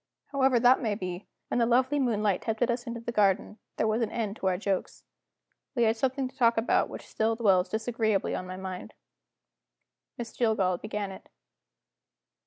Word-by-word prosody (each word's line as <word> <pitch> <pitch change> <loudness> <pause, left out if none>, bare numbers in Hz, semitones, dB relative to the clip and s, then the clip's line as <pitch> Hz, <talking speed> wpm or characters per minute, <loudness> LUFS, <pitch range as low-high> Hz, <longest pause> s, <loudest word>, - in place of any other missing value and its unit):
However 265 -3 +3
that 245 +2 +5
may 220 -4 0
be, 185 -1 -5 0.2
when - - 0
the 230 - +3
lovely 260 +4 +3
moonlight 210 -7 +1
tempted 230 +2 0
us 240 +1 -3
into 235 0 -5
the 235 - -4
garden, 210 0 +1 0.2
there - - +1
was 220 +2 +1
an 230 - 0
end 215 -3 -3
to 190 - -2
our 185 -1 +2
jokes. 195 -1 -3 0.7
We 240 - +3
had 225 0 +3
something 265 +3 0
to 260 - -14
talk 235 -4 +3
about 225 - +2
which - - -8
still 225 +1 0
dwells 195 -5 +3
disagreeably 220 -2 0
on 185 - -4
my 185 0 -6
mind. 190 -1 -7 1.2
Miss 235 -1 -7
Jillgall 195 -7 +1
began 210 -2 -4
it. 190 - -12
220 Hz, 180 wpm, -28 LUFS, 200-240 Hz, 1.2 s, that